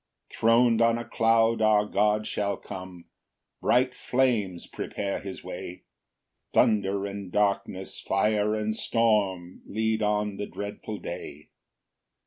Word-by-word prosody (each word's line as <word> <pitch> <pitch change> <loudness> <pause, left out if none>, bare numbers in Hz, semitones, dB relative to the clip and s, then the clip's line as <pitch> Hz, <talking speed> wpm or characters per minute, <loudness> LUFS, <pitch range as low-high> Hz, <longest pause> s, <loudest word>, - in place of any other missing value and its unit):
3 - - -12
Thron'd 115 0 +4
on 115 0 +4
a 120 - -5
cloud 115 0 +2
our 105 -1 +4
God 105 +1 +1
shall 100 -1 -1
come, 90 -3 -9 0.6
Bright 125 +1 +3
flames 115 -11 0
prepare 100 -1 -4
his 95 -1 -8
way, 90 - -7 0.7
Thunder 100 -2 +3
and 100 -2 -6
darkness, 100 -2 -1
fire 105 +2 +1
and 110 0 -1
storm, 100 -7 0
Lead 110 +1 0
on 105 -1 0
the 105 - -4
dreadful 105 +1 -6
day. 75 -4 -8
105 Hz, 120 wpm, -27 LUFS, 100-110 Hz, 0.7 s, Thron'd